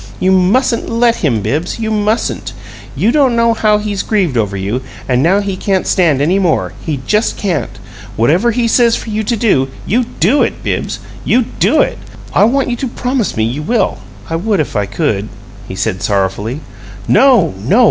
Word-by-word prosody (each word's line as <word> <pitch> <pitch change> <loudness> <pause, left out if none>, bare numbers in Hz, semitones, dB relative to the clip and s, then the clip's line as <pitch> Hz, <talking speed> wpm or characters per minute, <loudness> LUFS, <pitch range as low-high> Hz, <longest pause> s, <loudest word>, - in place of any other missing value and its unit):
You 185 - +2
mustn't 215 +7 +2
LET 230 0 +2
him, 120 - 0
Bibbs 150 - -2
you 220 -1 -3
mustn't! 215 +1 -1 0.4
You 225 - +2
don't 265 -4 +3
know 230 0 +3
how 215 -1 +2
he's 210 -1 -3
grieved 190 - 0
over 105 -4 -1
you, 100 +7 -2 0.3
and 125 -1 +2
now 185 +7 +3
he 200 -2 -3
can't 190 0 -1
stand 155 -7 +2
any 180 +6 +2
more 175 -5 0
he 150 -5 -3
just 210 +2 +1
can't! 165 - -2 0.4
Whatever 165 - +2
he 235 0 0
says 235 0 +3
for 225 - -6
you 215 +1 -1
to 230 +2 -1
do, 165 - +2 0.2
you 240 +5 +1
DO 230 - +1
it, - - -1
Bibbs, - - -3 0.2
you 255 - +2
DO - - +1
it! - - -1 0.3
I - - +5
want 265 +2 +1
you - - 0
to 265 - -3
promise 250 - -2
me 110 - +1
you 120 +7 -2
will." 225 +9 0 0.3
"I 165 - -2
would 205 +3 0
if 150 - -2
I 105 -1 0
could," 110 - -2 0.4
he 95 - -6
said, 95 -1 -2
sorrowfully. 100 +7 -1 0.5
"No, 265 - +4
no! 135 - +2
195 Hz, 190 wpm, -14 LUFS, -, 0.5 s, I